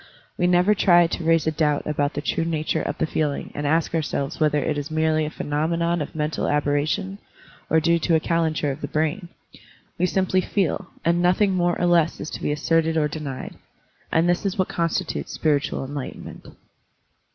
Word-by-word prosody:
We 180 Hz, -, +1 dB
never 180 Hz, +3 st, +4 dB
try 175 Hz, -4 st, +5 dB
to 170 Hz, +1 st, -3 dB
raise 165 Hz, 0 st, +3 dB
a 160 Hz, -, +2 dB
doubt 150 Hz, -2 st, 0 dB
about 145 Hz, -1 st, -1 dB
the 145 Hz, -, -3 dB
true 165 Hz, -, 0 dB
nature 160 Hz, -2 st, -1 dB
of -, -, -3 dB
the -, -, +1 dB
feeling 150 Hz, -2 st, -2 dB
and 145 Hz, 0 st, -3 dB
ask 160 Hz, +2 st, +1 dB
ourselves 150 Hz, -2 st, -2 dB
whether 150 Hz, -1 st, +2 dB
it 150 Hz, +1 st, 0 dB
is 145 Hz, +1 st, -4 dB
merely 155 Hz, 0 st, +1 dB
a -, -, -3 dB
phenomenon 165 Hz, +3 st, -1 dB
of 150 Hz, -, -6 dB
mental 155 Hz, 0 st, -1 dB
aberration 150 Hz, +7 st, 0 dB, 0.5 s
or 160 Hz, -, +4 dB
due 170 Hz, +1 st, +2 dB
to 165 Hz, +1 st, +2 dB
a -, -, +4 dB
calenture 160 Hz, -3 st, 0 dB
of 135 Hz, +3 st, -7 dB
the -, -, -3 dB
brain. 160 Hz, +4 st, -1 dB, 0.7 s
We 180 Hz, -, +3 dB
simply 185 Hz, 0 st, +1 dB
feel, 190 Hz, -4 st, -1 dB, 0.2 s
and 170 Hz, +1 st, +2 dB
nothing 185 Hz, +3 st, +3 dB
more 175 Hz, -1 st, +1 dB
or 175 Hz, -, +1 dB
less 170 Hz, -2 st, +3 dB
is 155 Hz, -, -6 dB
to -, -, -6 dB
be -, -, -1 dB
asserted 160 Hz, +2 st, +1 dB
or 150 Hz, -1 st, +2 dB
denied. 150 Hz, -3 st, -6 dB, 0.5 s
And 165 Hz, +2 st, +3 dB
this 175 Hz, +3 st, +1 dB
is 195 Hz, -2 st, -2 dB
what 185 Hz, -, 0 dB
constitutes 170 Hz, -1 st, -2 dB
spiritual 145 Hz, -3 st, 0 dB
enlightenment. 140 Hz, 0 st, -7 dB
160 Hz, 190 wpm, -23 LUFS, 150-175 Hz, 0.7 s, try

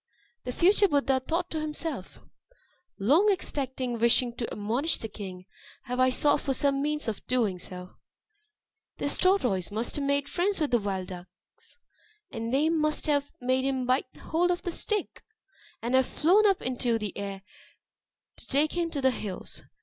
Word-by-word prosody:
The 250 Hz, -, -2 dB
future 395 Hz, +8 st, +4 dB
Buddha 275 Hz, -4 st, +2 dB
thought 335 Hz, +7 st, -2 dB
to 315 Hz, -, -2 dB
himself, 305 Hz, -, -5 dB, 0.8 s
"Long 310 Hz, -, +4 dB
expecting, 260 Hz, -, -2 dB
wishing 235 Hz, +1 st, +3 dB
to 235 Hz, -, -3 dB
admonish 235 Hz, +10 st, 0 dB
the 225 Hz, -, -6 dB
king, 190 Hz, -4 st, -8 dB, 0.4 s
have 250 Hz, -1 st, -4 dB
I 255 Hz, 0 st, +5 dB
sought 290 Hz, +3 st, +2 dB
for 270 Hz, -2 st, -1 dB
some 275 Hz, 0 st, +2 dB
means 300 Hz, -1 st, -1 dB
of 215 Hz, -3 st, -3 dB
doing 225 Hz, -7 st, +1 dB
so. 180 Hz, +1 st, -9 dB, 1.0 s
This -, -, 0 dB
tortoise 250 Hz, -, +2 dB
must 220 Hz, +6 st, -2 dB
have 290 Hz, -, -1 dB
made 280 Hz, 0 st, +1 dB
friends 380 Hz, +5 st, 0 dB
with 300 Hz, -4 st, 0 dB
the 240 Hz, -, +4 dB
wild 195 Hz, -3 st, -3 dB
ducks; 180 Hz, 0 st, -13 dB, 0.5 s
and 230 Hz, 0 st, -4 dB
they 280 Hz, +4 st, +3 dB
must 305 Hz, -2 st, +1 dB
have 285 Hz, -1 st, +1 dB
made 255 Hz, +1 st, +1 dB
him 265 Hz, -1 st, 0 dB
bite 255 Hz, +1 st, +1 dB
hold 345 Hz, +3 st, +1 dB
of 355 Hz, 0 st, -1 dB
the 355 Hz, -, -2 dB
stick, 420 Hz, +4 st, -2 dB, 0.6 s
and 235 Hz, +2 st, -1 dB
have 260 Hz, 0 st, +4 dB
flown 390 Hz, +7 st, +4 dB
up 390 Hz, -2 st, +1 dB
into 245 Hz, -2 st, 0 dB
the 210 Hz, -4 st, -5 dB
air 200 Hz, -1 st, -5 dB, 0.9 s
to -, -, -13 dB
take 290 Hz, +3 st, +2 dB
him 340 Hz, -1 st, 0 dB
to 290 Hz, -4 st, -3 dB
the 260 Hz, 0 st, +4 dB
hills. 205 Hz, -6 st, -6 dB
260 Hz, 170 wpm, -28 LUFS, 225-310 Hz, 1.0 s, I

